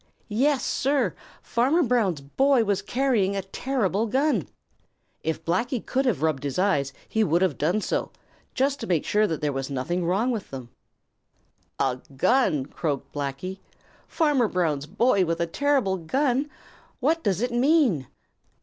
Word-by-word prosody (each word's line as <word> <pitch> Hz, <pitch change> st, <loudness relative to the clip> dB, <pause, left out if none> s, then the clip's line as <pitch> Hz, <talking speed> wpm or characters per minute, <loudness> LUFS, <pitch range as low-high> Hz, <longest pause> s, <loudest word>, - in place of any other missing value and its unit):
Yes, 265 Hz, +6 st, +1 dB
Sir, 265 Hz, -7 st, +1 dB, 0.3 s
Farmer 275 Hz, +9 st, +2 dB
Brown's 220 Hz, -, +1 dB
boy 265 Hz, -, +2 dB
was 200 Hz, -2 st, 0 dB
carrying 220 Hz, -4 st, +1 dB
a 195 Hz, -, -2 dB
terrible 220 Hz, 0 st, -1 dB
gun! 275 Hz, +7 st, +1 dB, 0.7 s
If 160 Hz, 0 st, -3 dB
Blacky 235 Hz, -, 0 dB
could 265 Hz, +1 st, 0 dB
have 205 Hz, -, 0 dB
rubbed 155 Hz, -4 st, 0 dB
his 140 Hz, -2 st, -3 dB
eyes, 180 Hz, -8 st, +1 dB, 0.2 s
he 220 Hz, -, +1 dB
would 170 Hz, -1 st, +2 dB
have 180 Hz, -7 st, +1 dB
done 175 Hz, +8 st, +1 dB
so, -, -, -2 dB, 0.4 s
just 275 Hz, +2 st, +1 dB
to -, -, -5 dB
make 170 Hz, -4 st, +1 dB
sure 210 Hz, +1 st, +2 dB
that 160 Hz, -5 st, -3 dB
there 145 Hz, -1 st, 0 dB
was 135 Hz, 0 st, -3 dB
nothing 140 Hz, +7 st, -2 dB
the 170 Hz, -, -2 dB
matter 210 Hz, +8 st, +1 dB
with 220 Hz, -5 st, -4 dB
them. 130 Hz, -3 st, -8 dB, 1.1 s
"A 130 Hz, -1 st, 0 dB, 0.2 s
gun!" 165 Hz, -, +2 dB
croaked 145 Hz, -1 st, -4 dB
Blacky. 145 Hz, +7 st, -4 dB, 0.5 s
"Farmer 295 Hz, -8 st, +2 dB
Brown's 155 Hz, -7 st, -1 dB
boy 205 Hz, -, +2 dB
with 165 Hz, -1 st, -1 dB
a 170 Hz, -, +1 dB
terrible 255 Hz, 0 st, +1 dB
gun! 265 Hz, -, 0 dB, 0.5 s
What 315 Hz, +5 st, +1 dB
does 195 Hz, -2 st, +1 dB
it 245 Hz, 0 st, 0 dB
mean?" 245 Hz, -, +3 dB
200 Hz, 160 wpm, -25 LUFS, 160-255 Hz, 1.1 s, mean